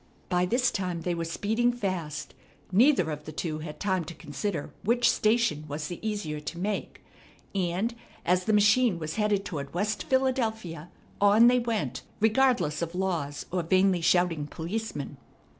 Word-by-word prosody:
By 180 0 +2
this 245 +4 +2
time 180 -3 -2
they 175 +1 -1
were 170 -1 -2
speeding 220 +8 +1
fast. 185 -10 -4 0.4
Neither 210 - +4
of 150 0 -6
the 155 - -6
two 155 0 -3
had 155 -1 -7
time 190 -3 0
to 170 - -8
consider 155 +2 -4
which 240 +3 +3
station 215 -8 +2
was 150 +1 -4
the 175 - -6
easier 205 -9 -3
to 150 +3 -6
make; 200 +3 -3 0.5
and, 190 +4 0 0.3
as 180 +1 +2
the - - +2
machine 210 0 +4
was 155 +1 -5
headed 210 -2 +1
toward 140 -1 -5
West 210 +4 -1
Philadelphia, 220 - 0 0.3
on 205 +3 +6
they 250 +1 +6
went, 230 -3 -2 0.2
regardless 220 - +2
of 170 +1 -3
laws 170 -7 -2
or 180 0 0
vainly 185 +1 +3
shouting 165 -3 +2
policemen. 160 -4 -5
185 Hz, 160 wpm, -28 LUFS, 165-220 Hz, 0.5 s, on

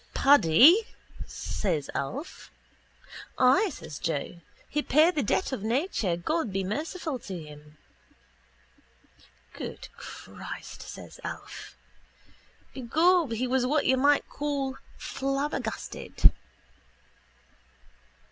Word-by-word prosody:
—Paddy? 285 - +7 0.4
says 165 -8 -2
Alf. 270 - -5 0.9
—Ay, 265 +12 +5
says 150 - -8
Joe. 165 +1 -2 0.3
He 300 - -1
paid 310 +5 +4
the 295 - 0
debt 275 - 0
of 260 - -3
nature, 225 - 0
God 280 - -1
be 195 0 -1
merciful 300 - -3
to 190 -5 -6
him. 150 -1 -13 1.8
—Good - - -7
Christ! - - -9
says - - -10
Alf. - - -7 1.0
Begob 315 +3 +2
he 245 +3 -1
was 250 0 +1
what 295 +2 +2
you 260 - +4
might 285 +2 +3
call 280 -2 -3 0.2
flabbergasted. 275 +2 0
265 Hz, 95 wpm, -28 LUFS, 195-300 Hz, 1.8 s, Paddy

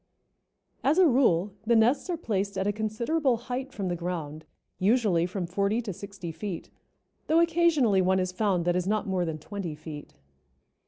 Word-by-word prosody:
As 290 +5 +3
a 375 - +7
rule 210 - +3
the 235 +2 +3
nests 245 +10 +3
are 350 - -1
placed 200 - -2
at 190 - 0
a 205 - +1
considerable 235 +6 0
height 250 +3 -5
from 195 -3 -4
the 175 - -1
ground, 160 -3 -5 0.3
usually 195 -5 +2
from 180 0 -3
forty 200 +5 0
to 220 -5 -4
sixty 195 -2 -8
feet, 185 +1 -6 0.6
though 320 +2 +4
occasionally 325 - +3
one 190 +1 +2
is 185 0 -1
found 185 -3 0
that 175 0 +2
is 180 0 -1
not 215 +1 0
more 185 -2 0
than 160 -2 -3
twenty 175 0 -6
feet. 150 -1 -9
200 Hz, 175 wpm, -27 LUFS, 180-240 Hz, 0.6 s, a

